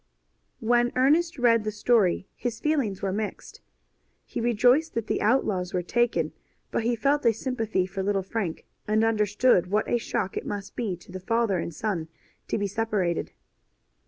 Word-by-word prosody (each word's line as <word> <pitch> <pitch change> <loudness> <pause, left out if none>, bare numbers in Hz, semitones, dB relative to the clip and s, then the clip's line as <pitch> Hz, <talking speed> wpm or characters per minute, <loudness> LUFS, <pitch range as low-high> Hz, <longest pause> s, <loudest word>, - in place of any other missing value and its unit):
When 240 +1 +3
Ernest 315 +6 +3
read 230 -3 +4
the 215 - -1
story 210 -4 +2
his 240 -2 -4
feelings 275 -12 0
were 195 -1 0
mixed. 210 +1 -5 0.6
He - - -4
rejoiced 245 +7 +3
that 230 -2 -1
the - - -1
outlaws 205 -6 +1
were 180 - 0
taken, 175 -7 +1 0.4
but - - 0
he 235 +2 +1
felt 280 +5 +1
a 235 - +5
sympathy 225 -4 -1
for 190 +1 -5
little 195 0 0
Frank, 195 -4 -3 0.2
and 215 +1 +2
understood 210 -2 +3
what 210 +2 +1
a 240 - +1
shock 195 -4 -2
it - - -3
must 205 0 -5
be 205 -7 -2
to 175 - -16
the 185 - -6
father 220 -1 +1
and 170 - -3
son 170 -2 -3 0.4
to - - -1
be 205 - -1
separated. 200 -4 -1
215 Hz, 170 wpm, -26 LUFS, 195-240 Hz, 0.6 s, a